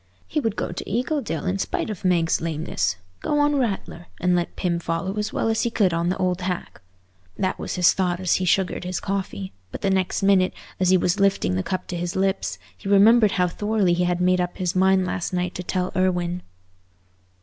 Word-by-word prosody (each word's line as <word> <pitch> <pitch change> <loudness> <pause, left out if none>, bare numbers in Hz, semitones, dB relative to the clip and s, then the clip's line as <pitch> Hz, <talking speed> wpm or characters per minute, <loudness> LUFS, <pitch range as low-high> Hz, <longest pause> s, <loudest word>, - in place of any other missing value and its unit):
He 305 - -1
would 225 -7 -1
go - - -3
to - - -6
Eagledale 250 +4 -1
in 190 +2 0
spite 215 - -2
of 200 - -7
Meg's 175 -3 +2
lameness—go 95 - -2
on 290 0 +3
Rattler, 195 -7 -3
and 180 0 +2
let 175 -1 -1
Pym 175 -2 -1
follow 170 +4 -2
as 210 - -2
well - - -1
as 225 0 +1
he 235 - +1
could 200 -6 +2
on 170 +1 0
the 185 - -1
old 180 0 0
hack. 180 - -4 0.6
That 185 - -1
was - - -4
his 180 -1 +5
thought 180 -2 0
as 185 -2 +2
he 185 - -1
sugared 190 -1 +1
his 180 0 -3
coffee; 185 - -4 0.2
but - - -7
the 195 - +1
next 190 +1 0
minute, 195 -2 +3 0.2
as 185 -1 +2
he 185 - +6
was 175 +1 +1
lifting 195 - +2
the 95 - 0
cup 185 - -3
to 180 - -3
his 175 0 -3
lips, 195 0 0 0.2
he 195 - -7
remembered 210 +2 +6
how 180 -1 +2
thoroughly 205 0 +1
he 180 +1 +1
had 175 0 0
made 180 0 +3
up 180 0 -3
his 180 0 -1
mind 190 0 +4
last 180 0 -3
night 180 0 -1
to - - -5
tell 180 0 -2
Irwine. 180 -1 0
185 Hz, 215 wpm, -23 LUFS, 175-195 Hz, 0.6 s, he